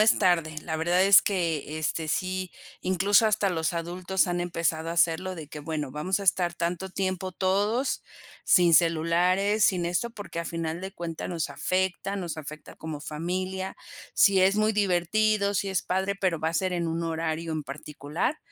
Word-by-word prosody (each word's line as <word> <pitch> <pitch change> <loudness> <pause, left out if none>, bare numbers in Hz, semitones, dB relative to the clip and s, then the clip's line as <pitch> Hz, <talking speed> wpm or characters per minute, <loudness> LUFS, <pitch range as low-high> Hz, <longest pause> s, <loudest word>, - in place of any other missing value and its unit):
es 215 +1 +5
tarde. 165 -4 +2
La 160 -2 -3
verdad 175 +3 +2
es 200 0 +8
que 165 -5 -1
este, 155 0 -2
sí, 185 +2 -2 0.3
incluso, 195 +4 +3
hasta 210 -2 +2
los 165 0 -1
adultos 175 +3 -1
han 175 -1 -1
empezado 165 -2 -1
a - - -2
hacerlo 170 +2 +1
de 160 -4 -9
que: 150 - -8
"Bueno, 150 -2 -4
vamos 165 +8 -1
a - - -4
estar 175 -2 +2
tanto 175 +3 -2
tiempo 185 0 -2
todos 205 +8 0 0.4
sin 175 -2 +5
celulares, 175 +6 +3
sin 180 -3 +2
eso, 180 +8 -1
porque 205 -6 -6
al 170 - -5
final 165 0 -3
de 190 +1 -6
cuentas 170 -4 -5
nos 165 -4 -2
afecta, 190 +6 -1
nos 175 -5 -4
afecta 155 0 -9
como 155 -2 -6
familia". 185 +5 -4 0.4
Sí, 195 -2 +5
es 190 +2 +4
muy 215 +1 +2
divertido, 200 +2 +1
si 200 0 0
es 190 - 0
padre, 190 +2 -1
pero 185 -4 0
va 160 - +1
a 165 - -4
ser 185 +1 0
en 170 -1 -1
un 165 +1 -2
horario 165 0 -2
en 155 -1 -2
particular, 150 - -4
175 Hz, 180 wpm, -27 LUFS, 165-190 Hz, 0.4 s, es